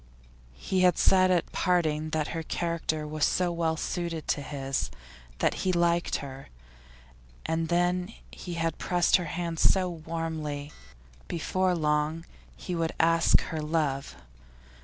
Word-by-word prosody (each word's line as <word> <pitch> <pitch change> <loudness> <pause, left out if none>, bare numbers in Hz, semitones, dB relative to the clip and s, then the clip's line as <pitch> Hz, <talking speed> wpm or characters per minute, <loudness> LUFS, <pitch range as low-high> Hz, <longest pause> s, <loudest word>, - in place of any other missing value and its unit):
He 190 - -1
had 180 -2 +4
said 185 -1 +5
at 180 -2 +1
parting 155 -4 +1
that 155 -1 -1
her 165 - -3
character 160 -1 -2
was 155 0 -3
so 180 -1 +2
well 165 -1 0
suited 170 -1 -3
to 145 - +1
his; 135 - -3 0.5
that - - +2
he 185 - +1
liked 170 -1 +2
her. 135 0 -10 1.0
And 160 0 0
then 180 +3 +1 0.2
he 175 -2 -7
had 165 -1 -1
pressed 175 0 +3
her 180 - -4
hand 170 0 -3
so 185 -1 +4
warmly. 160 -3 -4 0.6
Before 185 +2 0
long 155 +1 0 0.3
he 180 - -5
would 165 -1 -1
ask 165 0 +5
her 160 -1 -4
love. 150 - -1
165 Hz, 140 wpm, -28 LUFS, 155-175 Hz, 1.0 s, said